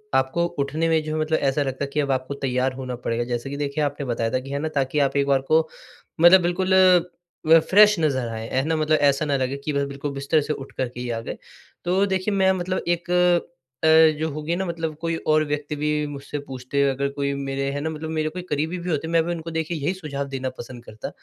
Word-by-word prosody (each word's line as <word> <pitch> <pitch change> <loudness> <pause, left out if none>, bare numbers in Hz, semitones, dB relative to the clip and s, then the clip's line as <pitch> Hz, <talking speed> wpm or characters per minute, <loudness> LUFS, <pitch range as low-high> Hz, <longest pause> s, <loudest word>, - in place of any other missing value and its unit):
आपको 135 +6 +2
उठने 155 +4 0
में 160 -1 +3
जो 155 0 -4
है - - -1
मतलब 160 +1 +1
ऐसा 140 +1 +1
लगता 135 0 -3
है 140 - -3
कि 150 - 0
अब 140 -2 +1
आपको 130 +1 -2
तैयार 130 -1 -1
होना 130 -1 -5
पड़ेगा। 120 -1 -2
जैसे 120 +2 -4
कि 140 - -5
देखिए 145 +1 -1
आपने 145 -1 -2
बताया 115 -2 -1
था 130 - +1
कि 130 +1 -10
है 140 - -2
ना 160 - -2
ताकि 135 +1 0
आप 140 -1 +1
एक 140 - +2
बार 135 -1 +3
को 160 0 +4 0.5
मतलब 175 +2 +8
बिल्कुल 180 +2 0 0.8
अ, 165 - +9
फ्रेश 210 +3 +5
नज़र 135 -6 0
आए 110 0 -5
है 130 - 0
ना? 160 +1 +1
मतलब 155 0 +2
ऐसा 140 0 +2
ना 145 -2 +1
लगे 130 +1 -2
कि 150 - 0
वह 140 0 +1
बिल्कुल 140 +1 -5
बिस्तर 140 +3 +1
से 150 +1 -2
उठ 135 -2 -9
कर 130 - -1
के 125 - -10
ही 125 0 -4
आ 115 -1 -2
गए। - - -6 0.5
तो 185 +3 +2
देखिए, 190 +1 -1
मैं 190 -1 +4
मतलब 185 0 -2
एक 175 0 -1 0.7
अ, - - +4 0.3
जो 160 +1 -1
होगी 155 +3 -3
ना 190 +2 -2
मतलब 165 -3 -3
कोई 165 0 -1 0.2
और 155 0 +4
व्यक्ति 150 0 -3
भी 150 +1 -1 0.2
मुझसे 145 0 -6
पूछते, 130 +1 -2
अगर 135 +1 -1
कोई 140 0 -2
मेरे 135 0 -2
है 145 +1 -3
ना 160 - -2
मतलब 160 0 -6
मेरे 155 -1 -1
कोई 180 +3 -6
करीबी 155 +5 -1
भी 180 0 -5
होते 160 -1 -1
हैं, - - -5
मैं 165 -1 +4
भी 175 - -2
उनको 165 0 -6
देखिए 160 +1 -2
यही 150 +5 -1
सुझाव 150 -7 -5
देना 135 -1 -3
पसंद 120 0 -9
करता 110 - -7
145 Hz, 250 wpm, -23 LUFS, 135-160 Hz, 0.8 s, अ